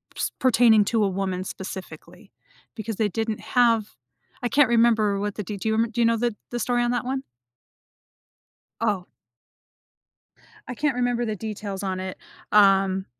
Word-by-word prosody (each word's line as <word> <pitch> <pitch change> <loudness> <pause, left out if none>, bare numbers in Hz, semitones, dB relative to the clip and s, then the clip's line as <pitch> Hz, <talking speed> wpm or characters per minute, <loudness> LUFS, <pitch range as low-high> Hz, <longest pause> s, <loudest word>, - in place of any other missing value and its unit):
s - - -2
pertaining 230 -5 +5
to 225 0 +1
a 195 - +2
woman, 190 -1 -2
specifically, 185 0 -9 0.4
because 220 -1 -5
they 210 0 0
didn't 220 +2 -3
have 230 - +2 0.5
I 245 - 0
can't 280 -1 +4
remember 225 -4 +3
what 205 0 -3
the 210 - -4
de 205 +1 -6
do 220 - -4
you 220 - +1
rem 225 +1 +1
do 240 +1 -1
you 230 - +4
know 230 0 +3
the 235 -2 -1
the 240 - -4
story 245 +1 +1
on 240 - +1
that 245 0 -1
one? 265 +1 -2 1.6
Oh. 205 -5 0 1.6
I 250 - -5
can't 290 +1 0
remember 245 -1 0
the 215 -2 -3
details 205 -2 -5
on 185 -1 -2
it. 185 0 -5 0.4
Um, 195 -2 +4
220 Hz, 170 wpm, -24 LUFS, 195-240 Hz, 1.6 s, pertaining